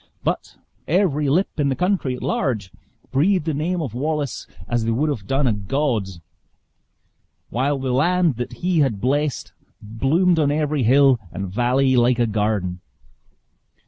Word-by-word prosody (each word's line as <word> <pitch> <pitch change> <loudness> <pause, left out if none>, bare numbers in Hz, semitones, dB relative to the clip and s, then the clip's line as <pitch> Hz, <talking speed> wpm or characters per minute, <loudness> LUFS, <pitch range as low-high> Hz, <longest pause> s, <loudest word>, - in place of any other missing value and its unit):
But - - -2 0.3
every 150 -5 +1
lip 170 +3 0
in 140 -1 +2
the 135 - 0
country 180 -7 0
at - - -9
large 105 -9 -1 0.4
breathed 165 +5 +2
the 160 - -1
name 165 +4 -1
of 130 -7 -5
Wallace, 145 0 -3 0.2
as 120 -1 0
they 115 - -1
would 135 +7 +1
have 105 -9 -5
done 135 +1 +1
a 120 - +2
god's; 105 - -2 1.3
while 135 +5 0
the 130 -1 -2
land 170 0 +2
that 120 - -4
he 180 -3 +2
had 130 -9 +1
blessed, 145 +5 -1 0.3
bloomed 155 - +1
on 145 -2 +2
every 150 -1 0
hill 130 +1 +5
and 95 0 -5
valley 130 +3 +2
like 120 0 +3
a 120 - +2
garden. 105 -4 -1
135 Hz, 155 wpm, -21 LUFS, 115-150 Hz, 1.3 s, hill